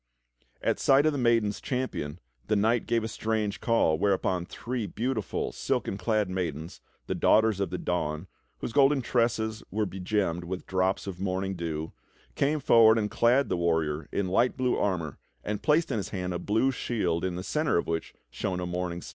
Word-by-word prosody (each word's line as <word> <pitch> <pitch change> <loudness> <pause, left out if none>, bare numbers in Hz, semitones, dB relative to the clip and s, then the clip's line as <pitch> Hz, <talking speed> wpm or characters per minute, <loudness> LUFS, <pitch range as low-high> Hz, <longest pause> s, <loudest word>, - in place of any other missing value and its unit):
At - - +1
sight 140 +2 +4
of 155 - +4
the 145 - -3
maiden's 115 -4 +2
champion, 125 - -3 0.3
this 105 - +2
knight 110 +3 +2
gave 115 -1 +1
a - - -2
strange 110 -2 -2
call, 100 -10 +2
whereupon 95 -3 +1
three 120 -3 -4
beautiful, 115 +1 -2
silken - - -2
clad 105 +2 0
maidens, 85 -4 -4 0.2
the - - -2
Daughters 110 -2 +3
of 100 - 0
the 90 - -3
Dawn, 80 -2 -2 0.3
whose - - -5
golden 140 -1 +4
tresses 115 -2 0
were 105 0 0
begemmed 95 -2 -1
with 90 +1 -5
drops 95 0 0
of 95 -3 -6
morning 95 0 -1
dew, 80 -2 -4 0.4
came 150 +2 +1
forward 115 -4 +6
and 105 -2 -1
clad 125 +4 +3
the 90 - -1
warrior 80 -3 0
in 100 - -1
light 115 +9 +2
blue 125 -1 +1
armor 85 -7 -1 0.2
and 105 0 -3
placed 155 +2 +2
in - - 0
his 100 - -3
hand 90 -2 -3
a 85 - -3
blue 110 +6 +1
shield 95 -10 -1
in 95 -1 -1
the 90 - -5
centre 150 - +1
of - - 0
which 80 -1 -3 0.2
shone 90 +8 -3
a 90 - -3
morning 90 0 -3
star. - - -9
100 Hz, 190 wpm, -28 LUFS, 90-115 Hz, 0.4 s, forward